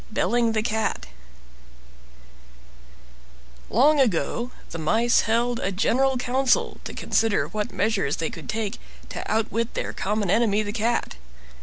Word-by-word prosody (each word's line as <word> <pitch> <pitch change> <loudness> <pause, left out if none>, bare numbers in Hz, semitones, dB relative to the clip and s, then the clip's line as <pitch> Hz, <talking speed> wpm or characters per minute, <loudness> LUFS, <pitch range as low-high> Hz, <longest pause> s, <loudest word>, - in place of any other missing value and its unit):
BELLING 235 +1 +1
THE 215 -1 0
CAT 220 - -1 2.6
Long 285 +7 +4
ago, 235 - +1 0.2
the 165 - -5
mice 225 +10 +3
held 235 +1 +1
a 195 - -1
general 260 +7 +2
council 250 +1 +1
to - - -6
consider 205 -10 +1
what 210 +3 -3
measures 195 -6 0
they 165 - -2
could 165 - -10
take 215 -2 -3 0.3
to - - -5
outwit 225 +1 -1
their - - -3
common 205 -1 -1
enemy, 215 -1 +2
the 205 0 -4
Cat. 230 - -1
220 Hz, 130 wpm, -24 LUFS, 200-240 Hz, 2.6 s, Long